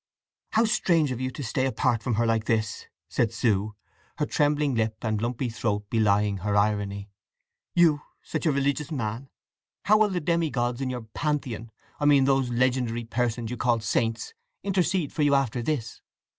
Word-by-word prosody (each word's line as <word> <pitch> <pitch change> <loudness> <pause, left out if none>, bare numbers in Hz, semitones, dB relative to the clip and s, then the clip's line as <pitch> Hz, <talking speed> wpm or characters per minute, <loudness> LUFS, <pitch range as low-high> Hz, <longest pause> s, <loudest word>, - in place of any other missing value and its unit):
"How 220 +1 +4
strange 165 -9 +2
of 125 0 -4
you 130 - -1
to 140 +3 -7
stay 130 +2 0
apart 125 -3 +1
from 120 -1 -1
her 120 +2 +2
like 115 -1 +1
this!" 110 -2 -1 0.2
said 115 -3 0
Sue, 110 -3 0 0.4
her 150 - +1
trembling 145 -1 +1
lip 110 -2 0
and 110 -2 -1
lumpy 120 +2 -1
throat 105 -3 -2
belying 105 -2 +2
her 100 +2 0
irony. 100 -1 0 0.6
"You, 160 -4 +4 0.2
such - - -2
a - - +4
religious 140 +2 0
man. 125 -1 -3 0.6
How 215 +1 +5
will 215 -1 +4
the 185 -2 -1
demi 170 0 +1
gods 120 -1 -1
in 130 - -1
your 125 -2 -4
Pantheon—I 120 -1 -4
mean 140 -2 +5
those 135 -2 +2
legendary 120 -1 0
persons 120 0 -2
you 125 - -4
call 120 0 +2
saints—intercede 180 - -1
for - - -2
you 145 -1 +4
after 130 -3 0
this? 120 -4 -3
125 Hz, 170 wpm, -26 LUFS, 110-145 Hz, 0.6 s, How